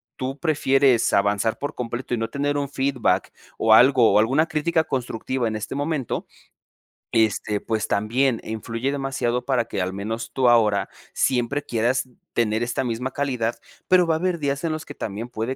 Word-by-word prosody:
tú 135 +2 -4
prefieres 135 -5 +3
avanzar 100 +2 +2
por 145 - -4
completo 125 +1 -4
y - - +1
no 115 0 -2
tener 145 +1 -1
un 140 -1 -2
feedback 130 -10 0 0.3
o 110 -1 +4
algo 125 0 +6
o - - +6
alguna 135 +9 +3
crítica 160 +1 +1
constructiva 125 -1 -2
en 110 - -3
este 110 +4 -5
momento, 145 -3 -2 0.9
este, 110 -2 +1
pues 110 -2 -2
también 115 +4 +1
influye 115 +4 -3
demasiado 135 -3 -2
para 125 -4 +1
que, 105 - -3
al 90 +1 -2
menos 110 +4 -4
tú 130 -2 +3
ahora, 105 -4 +3 0.2
siempre 130 +3 0
quieras 125 +2 0 0.2
tener 110 -1 +1
esta 120 +2 -1
misma 125 +2 -3
calidad. 125 -5 -1 0.3
Pero 180 -2 +5
va 165 - +2
a - - +1
haber 180 0 -1
días 140 0 -2
en 160 - 0
los 155 0 -5
que 145 - -9
también 110 +3 -5
puede 120 +2 -3
125 Hz, 175 wpm, -23 LUFS, 110-140 Hz, 0.9 s, algo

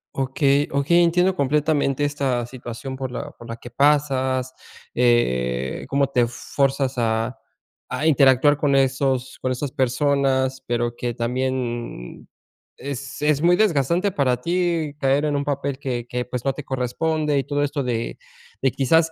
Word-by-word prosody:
Okey, 135 +2 +2
okey. 145 +5 +3
Entiendo 180 +2 +3
completamente 145 -1 +1
esta 140 -4 0
situación 125 +2 -7
por 130 -1 -4
la - - -5
por 120 - -14
la 115 - -5
que 120 - -11
pasas, 130 -1 +1 0.4
eh, 65 - +1
como 140 0 +1
te 125 -3 +2
fuerzas 135 +2 -1
a 115 +1 0 0.6
a 150 - -2
interactuar 140 -1 +5
con 145 -1 +1
esos 130 -1 +1
con 130 - -1
esas 130 +2 -4
personas, 130 0 +1
pero 120 0 -1
que 120 -1 -2
también 120 - -3 0.5
es 140 0 -6
es 150 -1 +2
muy 175 +2 +5
desgastante 180 -1 +2
para 130 -7 0
ti 170 -2 0
caer 140 0 +2
en 150 -1 0
un 140 - -2
papel 140 -1 -2
que 125 -4 -3
que, 125 0 -2
pues, 125 -1 -5
no 135 - +1
te 145 - -8
corresponde 150 +4 -1
y 135 - -3
todo 145 0 0
esto 145 0 -1
de 120 -3 -2 0.4
de 135 - +2
quizás, 160 +6 +2
135 Hz, 155 wpm, -22 LUFS, 125-145 Hz, 0.6 s, interactuar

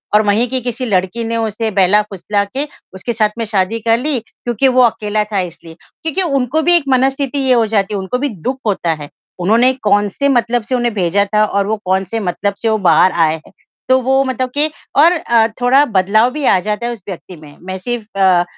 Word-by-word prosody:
और 215 - +6
वहीं 215 +4 +2
की 260 -1 -1
किसी 245 +1 -4
लड़की 200 +2 -1
ने 230 0 -2
उसे 220 0 -2
बहला-फुसला 200 +1 +1
के 265 +8 -4 0.3
उसके 210 +5 -4
साथ 215 -1 +1
में 230 - -2
शादी 210 +1 -1
कर 225 +1 +2
ली, 280 -2 -1
क्योंकि 240 +3 -2
वो 255 0 +4
अकेला 215 -2 0
था 195 - +1
इसलिए। 170 -2 -7 0.3
क्योंकि 325 +4 0
उनको 275 -2 0
भी 350 +2 +4
एक 335 - +4
मनस्थिति 270 +2 +1
ये 260 -2 +3
हो 230 -2 +3
जाती 205 -1 0
है 200 - -1
उनको 190 +7 -3
भी 285 0 -1
दुःख 245 +6 -4
होता 175 -5 0
है, 150 -2 -9 0.3
उन्होंने 230 +8 +3
कौन 205 0 +2
से 280 +8 -1
मतलब 240 -2 +1
से 255 - +1
उन्हें 240 -2 0
भेजा 200 +1 +1
था 215 - +4
और 200 -1 -1
वो 220 0 -1
कौन 190 +1 +1
से 225 - -1
मतलब 200 +1 -2
से 225 - +1
वो 220 - +2
बाहर 175 +4 +5
आए 160 -2 +2
हैं। - - -17 0.4
तो 260 0 +5
वो 265 +2 +2
मतलब 255 -1 -2
के 300 +1 +3 0.3
और 335 +3 +6
अ, 235 -9 +2
थोड़ा 265 +4 +4
बदलाव 215 +2 +2
भी 295 -1 -4
आ 185 - +4
जाता 235 +3 -2
है 240 - -2
उस 220 - -12
व्यक्ति 180 0 -8
में, 150 -2 -15
मैं 190 +1 -6
सिर्फ 235 +3 -4
अ, 185 -2 +4
225 Hz, 225 wpm, -16 LUFS, 195-255 Hz, 0.4 s, और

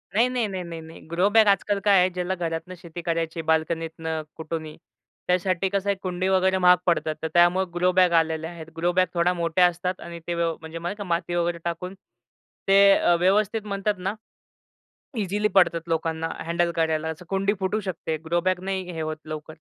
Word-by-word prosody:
नाही, 235 +3 +5
नाही, 245 -4 0
नाही, 190 -2 -4
नाही, 165 -1 -7
नाही. 160 +1 -12
ग्रो 180 +4 +3
बॅग 220 -2 +7
आजकाल 200 0 +2
काय 200 -2 +5
आहे, 180 +1 +4
ज्याला 180 +1 -2
घरातनं 170 +1 -4
शेती 170 0 -9
करायची 165 -1 -2
आहे - - -3
बाल्कनीतनं, 160 0 -1 0.2
कुठूनही, 160 -1 -5 0.5
त्यासाठी 185 +1 +1
कसं 200 0 0
आहे 200 - +2
कुंडी 185 0 -2
वगैरे 190 0 +3
महाग 180 0 +6
पडतात, 160 -3 +1
तर 160 - -1
त्यामुळे 175 +2 +4
ग्रो 180 +1 +3
बॅग 180 -1 +5
आलेल्या 160 0 -2
आहेत. 165 -2 -9
ग्रो 175 +2 +1
बॅग 185 0 +4
थोड्या 175 +1 +2
मोठ्या 170 +1 +2
असतात 175 +1 -1
आणि 170 0 -8
ते 175 - -1
व्यव 170 -1 0
म्हणजे 160 +1 -7 0.2
माती 175 -1 -2
वगैरे 170 0 0
टाकून 180 +2 -4 0.7
ते 200 0 +7
अ, 175 - +3
व्यवस्थित 210 +3 +2
म्हणतात 200 +1 -1
ना 190 +3 -2 1.1
इझिली 205 +1 0
पडतात 170 -3 +3
लोकांना 165 0 -1 0.2
हँडल 170 0 +1
करायला 160 -1 0
असं. 160 +2 -6
कुंडी 195 +1 +1
फुटू 200 +3 0
शकते, 180 -4 -3
ग्रो 170 +2 +1
बॅग 185 0 0
नाही 190 -2 -3
हे 160 - -5
होत 155 0 -3
लवकर. 155 0 -6
175 Hz, 190 wpm, -25 LUFS, 165-190 Hz, 1.1 s, बॅग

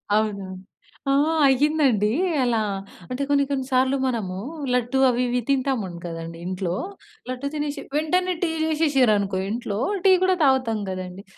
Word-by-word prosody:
అవును. 210 -2 0 0.7
ఆ! - - +4 0.4
అయ్యిందండి. 270 -6 +3 0.3
అలా 235 -2 +1 0.5
అంటే 255 +2 -2
కొన్ని 280 -1 +4
కొన్ని 265 -2 -1
సార్లు 260 +2 +3
మనము 210 -7 -2 0.4
లడ్డూ 250 +2 +1
అవి 245 0 0
ఇవి 245 0 0
తింటాము 260 -9 0
గదండీ 165 0 -6
ఇంట్లో. 185 -1 -2 0.5
లడ్డూ 255 +2 -3
తినేషి 295 -1 -3
వెంటనే 360 +4 +1
టీ 345 - +1 0.2
చేశేషిర్రనుకో 255 -12 +2
ఇంట్లో. 220 -3 -3 0.3
టీ 385 - +7
కూడా 370 0 +3
తాగుతాం 255 -6 +2
గదండీ. 185 +1 -6
250 Hz, 130 wpm, -23 LUFS, 200-280 Hz, 0.7 s, టీ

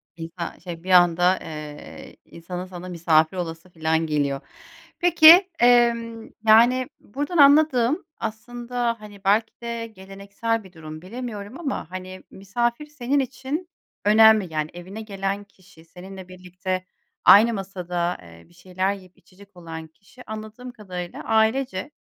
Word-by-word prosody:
İnsan, 165 +1 -7
şey, 170 -1 -9
bir 185 - -8
anda, 175 +1 +5
eee, 150 -1 -9
insanın 180 +2 -8
sana 185 0 -9
misafir 165 0 +2
olası 165 0 -6
filan 160 -1 -1
geliyor. 140 -3 -1 0.6
Peki, 345 +2 +7
emm, 235 -2 +2 0.2
yani, 240 +4 +5
buradan 290 - -4
anladığım 285 0 +4
aslında, 240 +1 -4
hani, 205 -2 -13
belki 210 +3 +2
de 235 -1 -5
geleneksel 200 +3 -5
bir 190 -2 -16
durum, 155 -1 -10
bilemiyorum 225 - -7
ama, 270 - -4
hani, 185 0 -8
misafir 235 +8 -2
senin 285 -2 -1
için 275 +6 -4 0.4
önemli. 215 -4 +5
Yani, 155 0 -2
evine 185 +5 -9
gelen 200 -1 -4
kişi 185 -4 -21
seninle 185 +2 -11
birlikte 185 0 -5 0.4
aynı 225 +4 +8
masada, 180 -3 -3
eee, 85 -1 -16
bir - - -23
şeyler 185 +2 -2
yiyip 185 -3 -14
içecek 200 +1 -20
olan 160 -2 -8
kişi 200 +10 -18
anladığım 220 +3 -8
kadarıyla 185 -6 -8
ailece 225 +2 0
195 Hz, 130 wpm, -23 LUFS, 175-235 Hz, 0.6 s, aynı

